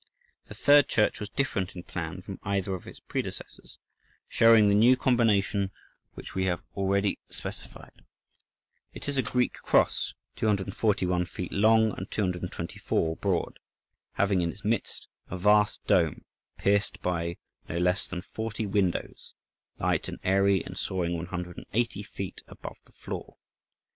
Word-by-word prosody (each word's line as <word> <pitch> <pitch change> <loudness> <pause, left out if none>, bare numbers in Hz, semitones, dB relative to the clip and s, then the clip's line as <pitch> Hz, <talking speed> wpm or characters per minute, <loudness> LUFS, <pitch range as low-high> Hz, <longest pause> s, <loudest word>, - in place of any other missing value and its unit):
The - - -10
third 145 -1 +6
church 105 -2 +2
was 105 -2 -5
different 105 -8 -1
in 90 - -7
plan 90 +1 -5
from 95 0 -7
either 100 -1 -1
of 90 - -6
its - - -10
predecessors, - - -6 0.5
showing 115 -2 +6
the 100 - +4
new 120 +5 +6
combination 105 -6 +2 0.5
which - - -9
we 95 0 0
have 90 -2 -1
already 100 0 +1
specified. - - -9 0.9
It - - -7
is 145 - -1
a 135 - +3
Greek 125 -1 0
cross, - - +1 0.2
241 95 -3 +1
feet 90 - -6
long 110 +2 +4
and 95 - -6
224 90 -4 -2
broad, 95 -4 -1 0.5
having 100 -2 +2
in 85 -1 0
its 105 - -14
midst 110 -1 -1 0.2
a 95 - -4
vast 105 +2 +3
dome, 80 -6 +2 0.3
pierced 100 0 +1
by 85 -1 -1 0.3
no 85 - -2
less 90 +2 +1
than 90 -1 -5
forty 110 0 -4
windows, 95 -3 -1 0.4
light - - 0
and - - -5
airy 100 0 +3
and - - -7
soaring 85 -2 -1
180 90 +6 -3
feet 100 -2 -7
above - - -9
the - - -25
floor. - - -7
100 Hz, 140 wpm, -28 LUFS, 90-105 Hz, 0.9 s, third